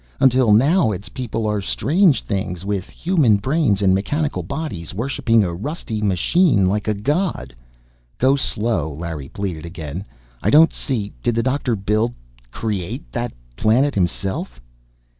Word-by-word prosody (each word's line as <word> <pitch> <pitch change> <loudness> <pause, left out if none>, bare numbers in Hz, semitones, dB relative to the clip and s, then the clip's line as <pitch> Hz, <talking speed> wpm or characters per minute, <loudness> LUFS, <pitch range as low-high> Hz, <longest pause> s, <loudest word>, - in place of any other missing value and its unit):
Until 130 -3 +4
now 135 - +4
its 100 0 -6
people 115 -3 -4
are 105 -1 0
strange 155 - +2
things, 95 -3 -3
with 100 -2 -2
human 155 - +2
brains 125 -4 +1
in 95 -1 +4
mechanical 145 +11 -1
bodies, 135 - -5
worshiping 115 -1 +2
a 85 -3 -2
rusty 110 - -4
machine 105 - +3
like 105 +3 -1
a 105 - +1
god 135 - -1 0.3
" - - -37
"Go 135 +2 +4
slow!" 110 - -1
Larry 75 -2 -6
pleaded 90 -6 -4
again. 85 0 -6 0.4
"I 105 - +1
don't 160 +6 +6
see 110 -7 -3
Did 120 -2 0
the 115 - +1
doctor 130 -2 0
build 110 +4 0 0.3
create 90 - -4
that 120 - -3 0.3
planet 130 +6 +3
himself?" 90 -8 -2
105 Hz, 145 wpm, -20 LUFS, 95-130 Hz, 0.4 s, don't